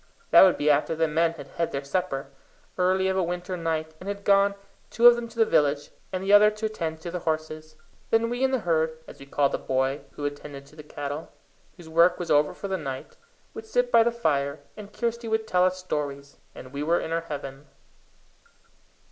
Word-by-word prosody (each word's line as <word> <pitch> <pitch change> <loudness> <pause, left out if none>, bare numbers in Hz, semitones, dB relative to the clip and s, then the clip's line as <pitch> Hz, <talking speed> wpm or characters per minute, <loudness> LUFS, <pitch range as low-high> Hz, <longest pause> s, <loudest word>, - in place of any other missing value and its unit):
That - - +9
would 185 -2 +6
be 145 - -2
after 150 +3 +1
the 160 0 +1
men 165 +2 +1
had - - -10
had 170 - -3
their 140 0 -3
supper, 140 -2 -3 0.4
early 190 +1 +2
of 190 - 0
a 190 - +2
winter 180 +1 -3
night, 160 -2 -3
and 190 - -7
had 200 0 -5
gone, 200 0 +4 0.3
two 235 - +1
of 240 0 +10
them 240 0 -5
to 230 0 -17
the 225 - +5
village, 145 -5 +1 0.2
and 185 0 -3
the 200 +1 +2
other 210 +1 +8
to 215 +1 -5
attend 165 -7 -4
to 170 - -6
the 180 - -3
horses. 155 -1 -4 0.3
Then 225 +1 +2
we 245 +2 -2
and 265 - +2
the 260 -3 0
herd, 160 -2 0
as - - -12
we 140 - -12
called 140 0 +1
the - - -2
boy 130 +2 -1
who 145 - -6
attended 145 -1 -6
to 145 - -19
the 155 - -10
cattle, 145 0 -6 0.5
whose 175 - -13
work 170 +2 +4
was 170 -2 -4
over 150 0 +3
for 200 - -6
the 190 -1 -1
night, 135 -5 -7 0.4
would 445 0 -9
sit - - 0
by - - +7
the 235 +1 +3
fire, 145 -10 -1
and 210 -1 -10
Kirsty 235 +1 -3
would 220 0 0
tell 180 -3 +3
us 185 0 0
stories, 145 -6 -5 0.2
and 130 +1 -11
we 140 - -4
were 165 +3 +2
in 160 - -5
our 165 0 0
heaven. 140 -3 -8
165 Hz, 225 wpm, -26 LUFS, 150-200 Hz, 0.5 s, of